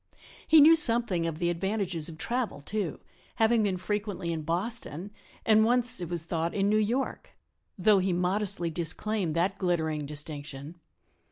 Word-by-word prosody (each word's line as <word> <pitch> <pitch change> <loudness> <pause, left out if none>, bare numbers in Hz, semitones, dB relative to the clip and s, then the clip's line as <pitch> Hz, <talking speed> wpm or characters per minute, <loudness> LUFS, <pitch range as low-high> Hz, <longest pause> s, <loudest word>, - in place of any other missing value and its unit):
He 315 -1 +7
knew 320 +3 +8
something 230 - +1
of 160 -2 -4
the 175 +1 0
advantages 180 -2 -2
of 160 - -10
travel, 240 - -2
too, 185 +2 -4 0.3
having 225 0 +3
been 195 -3 0
frequently 205 -2 -3
in 160 - -3
Boston, 180 +2 -3 0.3
and 220 -1 +5
once, 245 -1 +3
it 175 - -5
was 170 -2 -2
thought, 165 0 -2
in 200 0 +1
New 215 - +3
York, 235 +6 -2 0.4
though 200 +1 +4
he 185 0 0
modestly 180 0 0
disclaimed 170 +2 -2
that 190 +4 0
glittering 160 -5 -1
distinction. 145 +1 -6
185 Hz, 155 wpm, -28 LUFS, 165-215 Hz, 0.4 s, knew